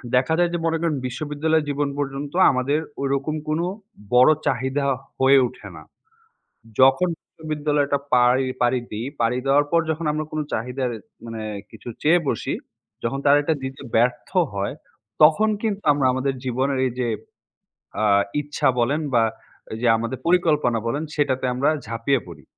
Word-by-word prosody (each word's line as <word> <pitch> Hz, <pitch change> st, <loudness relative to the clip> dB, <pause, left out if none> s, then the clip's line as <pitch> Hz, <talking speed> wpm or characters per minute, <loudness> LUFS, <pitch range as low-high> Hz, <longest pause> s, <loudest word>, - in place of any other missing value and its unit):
দেখা 135 Hz, +6 st, +2 dB
যায় 175 Hz, -1 st, +3 dB
যে 175 Hz, -, +1 dB
মনে 165 Hz, 0 st, +1 dB
করেন 165 Hz, -3 st, 0 dB
বিশ্ববিদ্যালয় 150 Hz, +4 st, -1 dB
জীবন 145 Hz, 0 st, -1 dB
পর্যন্ত 140 Hz, +1 st, -4 dB, 0.2 s
আমাদের 135 Hz, +3 st, 0 dB, 0.2 s
ওই 140 Hz, -, 0 dB
রকম 140 Hz, +3 st, -1 dB
কোন 155 Hz, +1 st, 0 dB, 0.5 s
বড় 125 Hz, +4 st, +7 dB, 0.2 s
চাহিদা 130 Hz, +3 st, 0 dB, 0.3 s
হয়ে 135 Hz, +1 st, +6 dB
ওঠে 125 Hz, -, -12 dB
না। -, -, -10 dB, 1.0 s
যখন 135 Hz, +7 st, +5 dB, 0.2 s
বিশ্ববিদ্যালয়টা 150 Hz, -2 st, -1 dB, 0.2 s
পাড়ি 125 Hz, +2 st, +4 dB, 0.2 s
পাড়ি 125 Hz, +1 st, +2 dB
দিই। 110 Hz, +3 st, -4 dB
পাড়ি 115 Hz, +2 st, +1 dB
দেওয়ার 140 Hz, +2 st, +4 dB
পর 170 Hz, -, +4 dB
যখন 160 Hz, +1 st, -2 dB
আমরা 155 Hz, +1 st, -2 dB
কোন 155 Hz, -, -2 dB
চাহিদার 125 Hz, +3 st, -2 dB, 0.3 s
মানে 115 Hz, -1 st, -6 dB, 0.3 s
কিছু -, -, -11 dB
চেয়ে 165 Hz, +4 st, +5 dB
বসি, 115 Hz, -, -1 dB, 0.5 s
যখন 120 Hz, +4 st, -2 dB
তারা 145 Hz, 0 st, +6 dB
এটা 160 Hz, -, +1 dB
দিতে 135 Hz, 0 st, -6 dB
ব্যর্থ 120 Hz, +2 st, +1 dB, 0.2 s
হয়, 100 Hz, +5 st, -2 dB, 0.5 s
তখন 160 Hz, +8 st, +6 dB
কিন্তু 210 Hz, -3 st, -2 dB
আমরা 140 Hz, -2 st, +1 dB
আমাদের 130 Hz, +1 st, -1 dB
জীবনের 130 Hz, +2 st, 0 dB
এই 125 Hz, -, -2 dB
যে 120 Hz, -, 0 dB, 0.9 s
আ -, -, +1 dB, 0.4 s
ইচ্ছা 145 Hz, 0 st, -1 dB
বলেন 140 Hz, +6 st, +1 dB
বা 115 Hz, -2 st, +4 dB, 0.5 s
এই -, -, -4 dB
যে 125 Hz, -, +2 dB
আমাদের 115 Hz, +3 st, -3 dB
পরিকল্পনা 155 Hz, -9 st, +2 dB
বলেন 145 Hz, +6 st, -1 dB
সেটাতে 135 Hz, -4 st, 0 dB
আমরা 135 Hz, +4 st, +2 dB, 0.2 s
ঝাঁপিয়ে 115 Hz, +4 st, 0 dB
পড়ি। 80 Hz, -5 st, -11 dB
135 Hz, 155 wpm, -23 LUFS, 125-150 Hz, 1.0 s, বড়